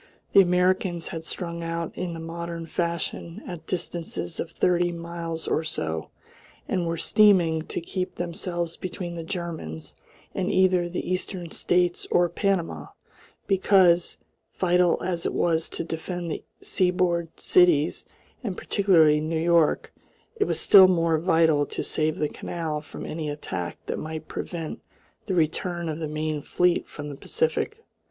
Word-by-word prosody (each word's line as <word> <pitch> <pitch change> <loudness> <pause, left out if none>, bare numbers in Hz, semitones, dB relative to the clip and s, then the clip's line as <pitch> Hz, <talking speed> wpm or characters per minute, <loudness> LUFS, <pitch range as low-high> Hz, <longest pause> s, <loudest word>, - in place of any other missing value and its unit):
The 195 - +9
Americans 180 -1 +1
had 165 -1 -5
strung 170 0 -4
out 165 0 -3
in 175 -2 -3
the - - -6
modern 165 0 -5
fashion 170 0 -3
at 170 -3 -8
distances 165 - -3
of 170 - -3
thirty 175 +1 +2
miles 170 -1 -5
or 160 - +1
so, 80 - -3 0.6
and 175 -2 0
were 165 0 -1
steaming 175 -5 +4
to - - -3
keep 180 +2 -4
themselves 175 -1 -3
between 180 -1 -5
the 165 -1 -5
Germans 165 - -5 0.4
and 185 - -1
either 185 -2 +3
the 180 - -4
eastern 180 -2 -3
states 175 0 +1
or 175 0 +3
Panama; 195 -4 -1 0.6
because, 185 -3 +4 0.4
vital 180 -1 +3
as 175 -2 -1
it - - -3
was 165 -1 +1
to - - -4
defend 170 +1 -4
the - - -4 0.2
seaboard 180 -2 0
cities 170 -4 +4 0.4
and 195 -6 -3
particularly 160 -7 +4
New 160 +1 -1
York, 170 -1 +2 0.4
it 415 -2 +1
was - - 0
still 190 -2 +9
more 165 -3 +2
vital 160 -3 +3
to - - -4
save 155 0 0
the 150 - +1
canal 155 -1 -4
from 150 - -9
any 155 -1 -4
attack 115 - -4
that - - -3
might 155 0 -6
prevent 165 -3 -5 0.5
the 190 - 0
return 170 +1 0
of 155 0 -3
the 160 - -2
main 155 0 -2
fleet 180 +4 +1
from 145 -1 -8
the 145 - -6
Pacific. 455 - -2
170 Hz, 150 wpm, -26 LUFS, 160-180 Hz, 0.6 s, The